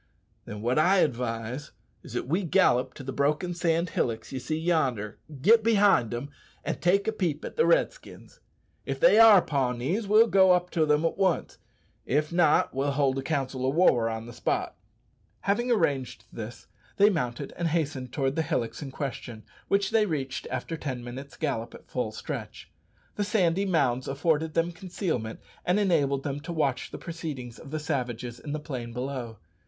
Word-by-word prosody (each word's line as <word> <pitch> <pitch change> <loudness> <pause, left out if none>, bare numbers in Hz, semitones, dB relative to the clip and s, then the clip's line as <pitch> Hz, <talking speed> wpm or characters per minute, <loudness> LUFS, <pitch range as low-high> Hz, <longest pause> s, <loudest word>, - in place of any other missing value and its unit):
"Then 105 +1 -7
wot 125 +5 +2
I 185 +5 +4
advise 125 +1 -2 0.3
is - - -11
that - - -2
we 170 +8 +1
gallop 130 -6 +2
to 135 - -9
the 135 - -4
broken 150 +5 0
sand 170 0 0
hillocks 115 -2 -2
ye 135 - -3
see 155 +4 -3
yonder, 135 - 0 0.2
get 220 +4 +6
behind 205 - +4
them, 120 +5 -5 0.3
an' - - -2
take 195 +4 +2
a - - +3
peep 175 -8 -2
at - - -7
the 470 - +3
Redskins. - - -1 0.4
If - - -4
they - - +6
are 220 -5 +8
Pawnees, 140 - -1
we'll 215 +3 +6
go 190 -4 +5
up 180 0 0
to 160 -3 +1
them 150 +2 +3
at 165 - -1
once; 190 -4 0 0.5
if 150 +5 0
not, 165 -3 +3
we'll 140 +1 0
hold 135 -1 +1
a - - -2
council 135 -3 -2
o' 130 - +2
war 135 -7 +3
on 110 0 -4
the 120 - -10
spot." - - -2 0.7
Having 240 +5 0
arranged 140 - 0
this, 115 +1 -8 0.3
they 205 +1 +6
mounted 135 -5 -3
and 170 - -1
hastened 145 -6 -2
towards 135 0 -1
the 160 - +1
hillocks 120 -8 -2
in 140 - -5
question, 125 -5 -6 0.2
which 200 0 +1
they 215 -2 +3
reached 135 -6 -3
after 165 - -4
ten 130 -5 -5
minutes' 130 +3 -8
gallop 115 -7 -3
at - - -16
full 125 -4 -2
stretch. 110 - -7 0.5
The 205 - +1
sandy 195 -2 +1
mounds 130 -8 +1
afforded 155 +2 0
them 165 +1 +1
concealment, 170 - -4 0.2
and 180 +3 +2
enabled 145 -9 +2
them 140 -1 -3
to 170 - -7
watch 145 -6 -1
the - - -7
proceedings 145 -8 -6
of - - -11
the 155 - -3
savages 125 -6 -3
in 145 - -7
the 150 - -2
plain 125 -6 -6
below. 125 -3 -4
150 Hz, 180 wpm, -27 LUFS, 125-175 Hz, 0.7 s, are